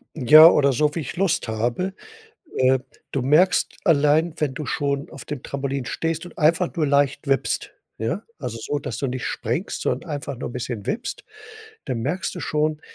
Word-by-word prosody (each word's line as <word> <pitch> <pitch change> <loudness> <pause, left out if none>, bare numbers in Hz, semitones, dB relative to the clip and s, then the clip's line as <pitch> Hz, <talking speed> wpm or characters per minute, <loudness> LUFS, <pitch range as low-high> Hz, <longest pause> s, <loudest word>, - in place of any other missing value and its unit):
Ja, 155 +3 +9
oder 140 -4 +3
so, 150 +3 +1
wie - - -1
ich 145 - -5
Lust 175 -6 0
habe. 120 - -1 0.6
Äh, 130 0 +4 0.3
du 135 - -1
merkst 160 +8 +3
allein, 155 -1 +3
wenn 145 -4 -1
du 150 +1 -5
schon 140 -1 -2
auf 135 - -10
dem 150 -4 -6
Trampolin 140 -1 -3
stehst 165 +4 -2
und 175 - -13
einfach 170 +2 +2
nur 155 -4 +1
leicht 140 +1 +1
wippst, 135 -1 0 0.2
ja. 115 - -2 0.2
Also 125 -4 -5
so, 145 +4 -2
dass 120 -5 -5
du 135 - -2
nicht 130 0 -4
springst, - - -3
sondern 170 - -2
einfach 145 -3 -4
nur - - -5
bisschen 120 -4 -5
wippst, 230 +4 -4 0.6
dann 120 - -2
merkst 155 +11 -2
du 180 - -6
schon, 155 0 -1
145 Hz, 180 wpm, -23 LUFS, 130-160 Hz, 0.6 s, Ja